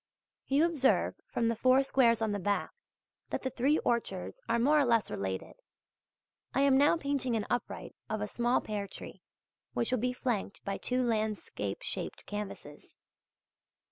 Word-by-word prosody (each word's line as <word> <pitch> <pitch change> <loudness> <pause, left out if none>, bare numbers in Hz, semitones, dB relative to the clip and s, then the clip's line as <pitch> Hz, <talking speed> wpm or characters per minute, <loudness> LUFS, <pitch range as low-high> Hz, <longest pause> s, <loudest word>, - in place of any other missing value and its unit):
You 285 +4 +4
observe, 305 -6 +2 0.2
from 230 - +1
the 230 - +1
four 255 +4 +4
squares 235 -4 +3
on 220 - +1
the 205 - -1
back, 205 +2 0 0.6
that - - -3
the 260 - -1
three 270 +5 +2
orchards 95 - -2
are 230 - +3
more 290 +6 +4
or - - +5
less 230 -4 +2
related. 95 -1 -3 1.0
I 270 - +3
am 280 -1 +5
now 290 +5 +5
painting 280 -5 0
an 215 - -1
upright 245 -1 -3
of 215 0 -1
a 205 - -1
small 240 +3 +1
pear 205 -2 -3
tree, - - -10 0.5
which 235 - -1
will 255 - +2
be 250 +3 +1
flanked 240 -6 -3
by 195 -1 -2
two 255 0 0
landscape 220 - -2
shaped - - -4
canvases. 205 -8 -7
235 Hz, 165 wpm, -31 LUFS, 210-265 Hz, 1.0 s, or